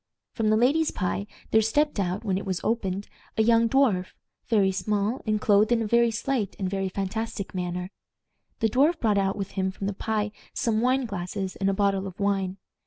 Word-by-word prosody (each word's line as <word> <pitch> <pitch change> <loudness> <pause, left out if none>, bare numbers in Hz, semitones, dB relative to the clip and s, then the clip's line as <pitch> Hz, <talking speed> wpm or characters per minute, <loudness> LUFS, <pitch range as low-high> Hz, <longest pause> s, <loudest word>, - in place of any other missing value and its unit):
From 220 -1 0
the 215 - +4
ladies' 290 +7 +3
pie 200 +2 -2 0.2
there 220 - +5
stepped 290 +4 +1
out, 185 +2 -1
when 195 -4 0
it 195 - -2
was 190 -2 -2
opened, 200 -3 -1 0.3
a 220 - +4
young 230 0 +4
dwarf, 225 -9 +3 0.4
very 200 -4 +3
small, 210 +5 -1
and 215 0 +2
clothed 210 +2 +4
in 230 -1 +3
a - - -2
very 235 +2 +4
slight 230 -2 -2
and 190 - -2
very 195 0 -1
fantastic 200 +2 -4
manner. 180 0 -3 0.7
The 225 - +3
dwarf 295 +9 +3
brought 210 -3 +2
out 195 0 +1
with 195 -2 -4
him 190 -1 -1
from 195 +1 -6
the 200 - -1
pie 210 +1 -1 0.2
some 220 -2 +1
wine 255 +2 +2
glasses 190 -1 -4
and 195 0 +1
a - - +1
bottle 195 -1 +1
of 190 +2 -10
wine. 195 -2 0
205 Hz, 200 wpm, -26 LUFS, 195-230 Hz, 0.7 s, there